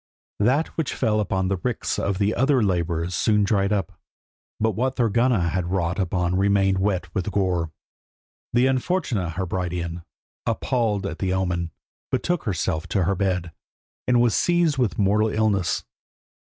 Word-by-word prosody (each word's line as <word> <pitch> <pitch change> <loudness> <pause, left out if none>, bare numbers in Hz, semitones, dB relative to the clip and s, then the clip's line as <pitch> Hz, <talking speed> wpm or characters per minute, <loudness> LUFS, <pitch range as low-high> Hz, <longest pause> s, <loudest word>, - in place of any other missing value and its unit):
That 130 +10 +2
which 160 -4 -1
fell 110 -4 +1
upon 95 -2 0
the 100 0 0
ricks - - -2
of 100 -1 -1
the 105 +2 +1
other 135 -1 +3
labourers 85 -2 0
soon 105 +5 +2
dried 100 0 +1
up, 100 -5 -2 0.6
but 110 +1 +2
what 130 +6 -1
Thorgunna 115 -5 +2
had 90 +1 -1
wrought 90 0 -1
upon 90 -1 0
remained 95 -1 +3
wet 95 -3 -1
with 95 0 -1
gore. 90 -5 0 0.8
The 120 +2 +3
unfortunate 130 - 0
Hebridean, 90 -2 -3 0.5
appalled 110 -6 0
at 100 - -4
the 95 -2 0
omen, 90 -3 -1 0.4
betook 175 +5 0
herself 80 -5 -1
to 95 - +1
her 95 +4 +1
bed, 90 -3 -1 0.6
and 125 -1 +4
was 120 -2 +3
seized 170 - +2
with 110 -9 +1
a - - +1
mortal 105 +3 +3
illness. 105 -5 +1
100 Hz, 150 wpm, -24 LUFS, 90-115 Hz, 0.8 s, and